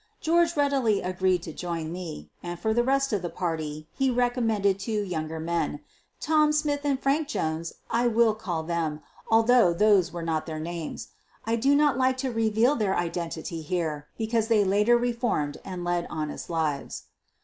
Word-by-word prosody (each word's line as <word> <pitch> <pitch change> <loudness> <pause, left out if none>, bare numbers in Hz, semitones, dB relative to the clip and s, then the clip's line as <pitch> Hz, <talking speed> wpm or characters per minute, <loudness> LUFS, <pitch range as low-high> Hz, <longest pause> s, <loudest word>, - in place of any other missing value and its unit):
George 335 0 +2
readily 270 -7 +2
agreed 185 -1 +1
to 160 - -7
join 165 -2 -4
me, 165 - -7
and 175 0 -6
for 220 0 0
the 240 +1 +2
rest 275 0 +1
of 200 - +1
the 175 - -3
party 155 -4 -4
he 270 -1 +1
recommended 230 -5 +1
two 210 +1 -1
younger 160 -4 -4
men 160 -2 -1 0.2
— - - -43
Tom 305 -1 +3
Smith 300 -1 +1
and 280 -2 +1
Frank 285 +3 +1
Jones, 160 - -2 0.2
I 240 +1 +2
will 230 -1 +4
call 180 -7 -3
them, 160 -2 -2 0.3
al 225 0 +6
Uiough 225 -8 +4
those 200 -4 +4
were 170 -1 -5
not 160 -1 -1
their 155 -1 -4
names. 165 0 -5 0.4
I 225 +1 +1
do 275 +5 +3
not 290 -3 +3
like 260 0 +2
to 260 -1 -2
reveal 225 +4 +2
their 205 -6 0
identity 170 -1 -3
here 155 -3 -2
because 225 0 0
they 220 -3 +4
later 210 +5 +4
re 240 0 0
formed 190 - -1
and 185 -2 -6
led 175 0 -1
honest 155 -2 -5
lives. 155 -4 -2
195 Hz, 180 wpm, -26 LUFS, 165-240 Hz, 0.4 s, al